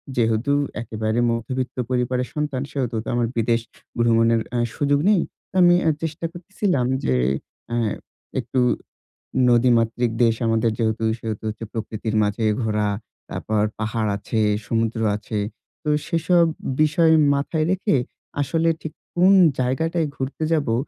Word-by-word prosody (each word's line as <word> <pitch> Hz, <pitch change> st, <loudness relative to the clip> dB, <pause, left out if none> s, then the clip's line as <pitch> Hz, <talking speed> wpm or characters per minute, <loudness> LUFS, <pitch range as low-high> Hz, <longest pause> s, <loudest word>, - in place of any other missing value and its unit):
যেহেতু 115 Hz, +3 st, +1 dB, 0.3 s
একেবারে 110 Hz, 0 st, -2 dB
মধ্যবিত্ত 125 Hz, +3 st, -3 dB
পরিবারের 125 Hz, 0 st, 0 dB
সন্তান 150 Hz, -4 st, -2 dB
সেহেতু 125 Hz, -4 st, -2 dB
তো -, -, -12 dB
আমার 120 Hz, -1 st, +1 dB
বিদেশ 115 Hz, +1 st, +2 dB, 0.4 s
ভ্রমণের 115 Hz, -1 st, +3 dB
আ -, -, +2 dB, 0.2 s
সুযোগ 145 Hz, 0 st, +2 dB
নেই। 205 Hz, -5 st, +4 dB, 0.3 s
তো -, -, -19 dB
আমি 175 Hz, 0 st, +7 dB
আ -, -, +6 dB
চেষ্টা 160 Hz, +1 st, -3 dB
করতেছিলাম 180 Hz, -, -1 dB, 0.2 s
যে 65 Hz, -, +2 dB, 0.6 s
আ -, -, +1 dB, 0.7 s
একটু 125 Hz, +2 st, -1 dB, 0.9 s
নদীমাতৃক 120 Hz, -1 st, +3 dB
দেশ 115 Hz, -1 st, +4 dB
আমাদের 115 Hz, 0 st, +2 dB
যেহেতু। 110 Hz, 0 st, 0 dB, 0.2 s
সেহেতু 110 Hz, -2 st, -4 dB
হচ্ছে 110 Hz, +1 st, -5 dB
প্রকৃতির 110 Hz, 0 st, -4 dB
মাঝে 105 Hz, +2 st, 0 dB, 0.2 s
ঘোরা, 105 Hz, -1 st, 0 dB, 0.4 s
তারপর 110 Hz, -1 st, -1 dB, 0.2 s
পাহাড় 110 Hz, 0 st, -1 dB
আছে, 110 Hz, +2 st, -2 dB, 0.3 s
সমুদ্র 115 Hz, 0 st, 0 dB, 0.2 s
আছে। 105 Hz, +1 st, -4 dB, 0.5 s
তো -, -, -3 dB, 0.2 s
সেসব 170 Hz, 0 st, +3 dB, 0.4 s
বিষয় 160 Hz, +2 st, +4 dB, 0.2 s
মাথায় 155 Hz, +3 st, 0 dB
রেখে 190 Hz, -2 st, +1 dB, 0.5 s
আসলে 165 Hz, +3 st, +1 dB
ঠিক 160 Hz, -, -5 dB, 0.2 s
কোন 185 Hz, +2 st, +6 dB, 0.3 s
জায়গাটায় 160 Hz, +6 st, 0 dB
ঘুরতে 135 Hz, +4 st, -3 dB
যাবো 145 Hz, -8 st, +1 dB
120 Hz, 130 wpm, -22 LUFS, 115-150 Hz, 0.9 s, আমি